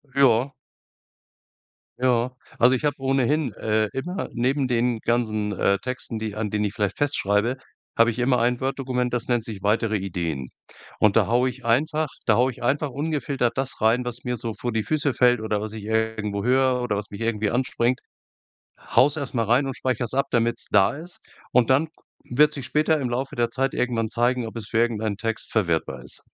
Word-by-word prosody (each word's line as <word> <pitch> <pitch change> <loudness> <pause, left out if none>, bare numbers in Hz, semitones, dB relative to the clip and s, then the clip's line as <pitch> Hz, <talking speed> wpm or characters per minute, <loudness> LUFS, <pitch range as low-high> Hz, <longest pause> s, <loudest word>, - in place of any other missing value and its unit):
Ja. 135 0 +4 1.5
Ja. 125 -1 +2 0.3
Also, 125 +2 +6
ich 150 - -4
habe 145 -1 +1
ohnehin, 135 +1 +1
äh, 110 0 0
immer 175 +8 -4
neben 130 +3 0
den 120 -1 +1
ganzen, 110 -3 0
äh, 100 0 +2
Texten, 125 0 -2
die 110 -1 -4
an 110 -1 -2
denen 105 0 -1
ich 100 - -2
vielleicht 105 -2 -2
fest 145 0 +1
schreibe, 105 +6 +1 0.4
habe 115 0 +5
ich 115 - -6
immer 125 0 +2
ein 120 +2 +1
Word 135 +1 -2
Dokument, 125 -2 -1
das 120 -1 -1
nennt 120 -3 +1
sich 105 -4 -6
weitere 110 +1 +1
Ideen. 85 -8 -3 0.5
Und 105 -2 +4
da - - +3
haue 125 +3 +2
ich 125 0 -10
einfach 150 +6 +1 0.2
da 110 - +4
haue 125 +3 +3
ich 120 0 -12
einfach 145 +4 +1
ungefiltert 135 -4 -1
das 135 -3 -1
rein, 120 +3 +3
was 125 0 -5
mir 125 -1 -2
so 115 0 -4
vor 120 +3 -4
die 110 -1 -1
Füße 145 -1 0
fällt 125 -1 +3
oder 110 -1 -1
was 105 +1 -5
ich 110 -2 -7
irgendwo 110 -2 -1
höre 130 0 +3
oder 120 -4 -1
was 105 0 -5
mich 100 - -8
irgendwie 110 -2 0
anspringt, 125 0 0 0.8
haue 130 - +3
es 145 - -4
erst 140 -5 -4
mal 115 -2 +1
rein 125 +6 +3
und 135 - -3
speicher's 125 -2 -1
ab, 135 +1 +1
damit 115 0 +1
es - - -2
da 100 0 +4
ist. 170 +5 -7 0.3
Und 125 0 +3
dann 140 +5 +3 0.5
wird 150 +3 +6
ku - - -7
sich 135 - -5
später 150 +4 +2
im 130 - -1
Laufe 130 +3 -3
der 120 -1 +1
Zeit 135 +3 -1
irgendwann 115 -3 -1
zeigen, 120 +1 +1
ob 110 - -9
es 110 -2 -6
für - - -3
irgendein 110 -3 0
Text 115 +1 -2
verwertbar 80 - 0
ist. - - 0
120 Hz, 205 wpm, -24 LUFS, 110-130 Hz, 1.5 s, Also